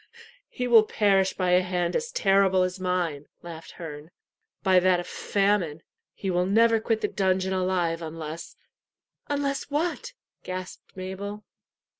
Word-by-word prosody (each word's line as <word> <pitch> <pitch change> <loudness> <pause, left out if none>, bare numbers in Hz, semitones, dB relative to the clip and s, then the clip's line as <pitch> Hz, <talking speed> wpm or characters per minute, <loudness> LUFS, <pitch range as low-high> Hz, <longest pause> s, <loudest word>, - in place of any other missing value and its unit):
"He 250 - -3
will 235 -2 +8
perish 195 -3 +2
by 185 -1 0
a 180 +1 +5
hand 180 -1 -1
as 475 +1 -1
terrible 195 - +3
as 185 +1 -3
mine," 175 -6 -1 0.2
laughed 165 -1 -9
Herne 155 -2 -8 0.5
"by 190 -2 +5
that 180 0 +3
of 175 - -5
famine. 195 -6 0 0.3
He 195 - -3
will 180 0 +1
never 225 +3 +4
quit 220 0 -1
the - - +1
dungeon 190 -1 0
alive 180 -3 0
unless 160 0 -7 0.4
" - - -50
"Unless 285 -1 -1
what?" 345 +11 -2 0.3
gasped 185 +1 -8
Mabel. 200 +3 -6
185 Hz, 145 wpm, -26 LUFS, 175-205 Hz, 0.5 s, will